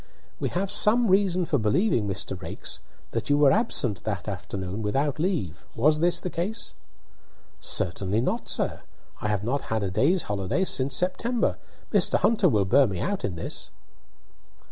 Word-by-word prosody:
"We - - -1
have 195 +2 -2
some 230 +1 +4
reason 185 -2 +3
for 145 -4 0
believing, 115 - +1
Mr. 95 0 -3
Raikes, - - -5 0.3
that - - -3
you 145 - +4
were 145 -2 +5
absent 135 - +1
that 100 -3 -4
afternoon 95 +1 -5
without 135 +8 -1
leave. 105 - -2
Was 150 +6 +3
this 175 +2 +2
the 180 - -4
case?" 205 +7 -2 0.9
"Certainly 95 +4 0
not, - - -2
sir. - - +1 0.4
I - - -1
have 105 -2 -1
not 130 +5 -1
had 110 -1 -1
a 95 - -2
day's 145 - +2
holiday 100 - -1
since 135 -7 0
September. 230 - 0 0.3
Mr. - - +4
Hunter 210 -3 +3
will 105 -7 +2
bear 135 +8 +5
me 95 -4 -4
out 200 0 -2
in 90 - -2
this." 85 - -4
135 Hz, 165 wpm, -26 LUFS, -, 0.9 s, were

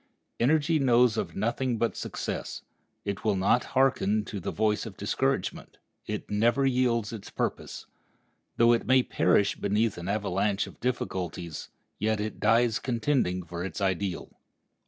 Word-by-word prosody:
Energy 155 +5 +3
knows 125 -3 +4
of - - -3
nothing 120 +3 -1
but 115 +1 0
success. - - -5 0.4
It 100 -1 -3
will 105 -2 +2
not 95 +6 +3
hearken 110 -6 +2
to 105 - -5
the 85 - -4
voice 110 +1 0
of 100 - -10
discouragement; 130 +2 -2 0.3
it - - -4
never 120 +6 +2
yields 120 -4 +1
its 105 -3 -8
purpose. - - -4 0.7
Though 115 0 +6
it 115 - -1
may 130 0 +5
perish 100 - +2
beneath 105 -1 0
an 85 - -6
avalanche 100 0 0
of - - -13
difficulties, 90 -9 -3 0.3
yet 110 +1 +1
it 105 0 -4
dies 115 +1 +3
contending 120 -7 0
for 85 +1 -6
its 95 -4 -5
ideal. 95 -2 -2
110 Hz, 145 wpm, -28 LUFS, 100-125 Hz, 0.7 s, Though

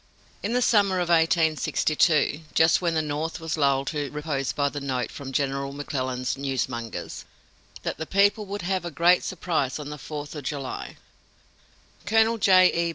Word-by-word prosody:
In 215 - -2
the 250 0 +2
summer 200 -5 +3
of 175 -1 -1
1862, 160 -2 +2 0.2
just 160 +2 +4
when 170 -2 0
the 160 - +1
North 155 +3 -3
was 160 -1 -3
lulled 140 -3 +2
to 145 -3 -3
repose 145 -2 -2
by 145 -1 0
the 145 0 -5
note 130 -3 -2
from 135 -1 -8
General 140 0 -1
McClellan's 130 -3 -3
newsmongers, 130 -4 -4 0.6
that - - -3
the 160 - -4
people 205 +2 +2
would 200 -1 -5
have 185 0 -1
a 175 - -4
great 170 +3 +3
surprise 165 -7 -1
on 150 -1 -7
the 150 - -7
Fourth 145 0 -7
of 150 -2 -7
July, 135 -1 -5 1.1
Colonel 225 +1 +3
J. 185 -2 +6
E. 170 0 0
155 Hz, 165 wpm, -25 LUFS, 140-175 Hz, 1.1 s, J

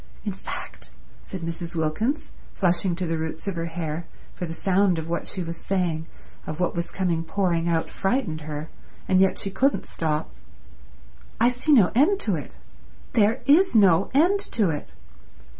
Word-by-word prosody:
In 205 - -1
fact," 195 - -8 0.3
said 190 - -7
Mrs. 165 +1 -5
Wilkins, 170 - -1 0.2
flushing 180 -1 +1
to 185 +1 -2
the 165 -1 -1
roots 160 +3 -5
of 195 - -1
her 165 0 -2
hair, 165 -1 -4 0.3
for 175 - -5
the 165 - -5
sound 190 -1 +2
of 160 0 -4
what 170 +1 -2
she 185 - -3
was 165 0 -5
saying, 170 -5 -1 0.4
of 155 +1 -5
what 180 - +1
was 170 0 -2
coming 175 -4 -1
pouring 170 -1 0
out, 165 -1 +1
frightened 190 -7 -1
her, 150 0 -5 0.4
and 185 -1 +4
yet 190 0 +4
she 195 - -2
couldn't 265 +9 +1
stop, 155 -1 -2 1.1
"I 235 +2 +5
see 250 +5 0
no 225 -11 +6
end 310 - +4
to - - +1
it. - - -7 0.6
There 220 +2 +3
is 320 +3 +5
no 190 -4 +5
end 355 +8 +4
to 205 -7 +3
it. 150 - -6
180 Hz, 175 wpm, -25 LUFS, 165-205 Hz, 1.1 s, no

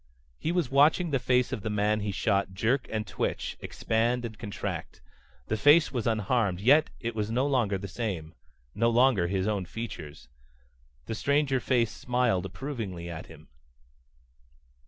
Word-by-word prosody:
He 160 - -1
was 170 -7 0
watching 155 +5 +4
the 135 - +2
face 125 0 +2
of 120 - -3
the 110 - -3
man 105 +1 +1
he 105 -1 -2
shot 100 0 0
jerk 115 +8 +1
and 110 -1 -2
twitch, - - -3
expand 120 +2 -1
and 110 -2 -6
contract. 105 -2 -5 0.5
The 110 - -1
face 145 +7 +5
was 120 -4 -2
unharmed, 110 -3 +1
yet 140 +9 +5
it 115 0 -3
was 105 -1 -2
no 125 +4 +1
longer 120 -8 +1
the 100 +1 -6
same. 90 -6 -4 0.4
No 115 +2 +2
longer 120 -6 +4
his 95 +1 -1
own 100 -3 -1
features. 85 - -7 0.8
The - - -4
stranger 140 +2 +1
face 120 -3 +1
smiled 125 -7 0
approvingly 95 -6 -5
at 80 - -7
him. 80 -1 -15
115 Hz, 155 wpm, -28 LUFS, 100-130 Hz, 0.8 s, face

